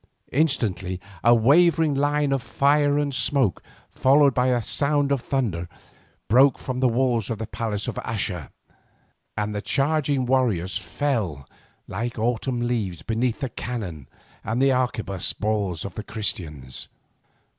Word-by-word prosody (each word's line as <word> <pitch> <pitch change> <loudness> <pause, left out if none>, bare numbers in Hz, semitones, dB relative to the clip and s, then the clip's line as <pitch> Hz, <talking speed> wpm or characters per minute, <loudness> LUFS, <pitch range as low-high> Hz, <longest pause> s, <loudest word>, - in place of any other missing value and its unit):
Instantly 105 - 0 0.2
a 120 +1 +6
wavering 160 +6 +4
line 145 +1 +1
of 135 -1 +1
fire 145 +2 +2
and 145 -1 0
smoke, 130 - +1 0.3
followed 140 +1 +4
by 125 +1 +2
a 125 -1 +2
sound 140 +4 0
as 140 - +2
of - - -17
thunder, 100 -11 -1 0.6
broke 130 +6 +5
from 130 -1 -4
the 130 - +4
walls 120 -3 +1
of 115 - -2
the 110 - -4
palace 105 -2 -3
of - - -2
Axa, 95 - -3 0.9
and 105 0 -1
the 105 - -3
charging 140 0 +1
warriors 110 -10 +1
fell 100 - -2 0.4
like 115 +6 -4
autumn 120 +2 -1
leaves 110 -9 -2
beneath 115 +4 -1
the 135 - -1
cannon 95 - -5 0.4
and 115 +3 -2
arquebuss 125 -8 0
balls 100 -6 -1
of 100 - -6
the 110 - -6
Christians. 75 -12 -4
120 Hz, 140 wpm, -24 LUFS, 105-135 Hz, 0.9 s, a